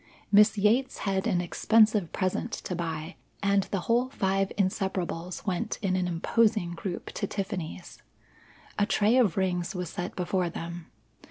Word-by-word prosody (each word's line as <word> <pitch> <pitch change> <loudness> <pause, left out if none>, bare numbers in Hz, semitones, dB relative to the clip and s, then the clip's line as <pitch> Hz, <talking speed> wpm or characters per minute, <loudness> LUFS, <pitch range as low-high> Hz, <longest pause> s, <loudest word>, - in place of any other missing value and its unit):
Miss 210 0 +6
Yates 225 +6 +2
had 195 +2 0
an 180 -6 +2
expensive 210 +1 +3
present 185 +4 -1
to 180 - -4
buy, 165 0 -4 0.3
and 200 -1 +3
the 195 - -2
whole 240 +6 +1
five 195 -5 0
Inseparables 185 -3 -2
went 200 +3 -1
in 185 -2 +1
an 180 -1 0
imposing 180 +2 +1
group 175 +1 -5
to 200 - -2
Tiffany's. 190 -4 -5 0.8
A 205 - +3
tray 220 +2 +3
of 215 -9 +3
rings 180 0 0
was 180 -3 -4
set 175 - -5
before 180 -1 0
them. 170 0 -7
190 Hz, 150 wpm, -28 LUFS, 175-210 Hz, 0.8 s, Miss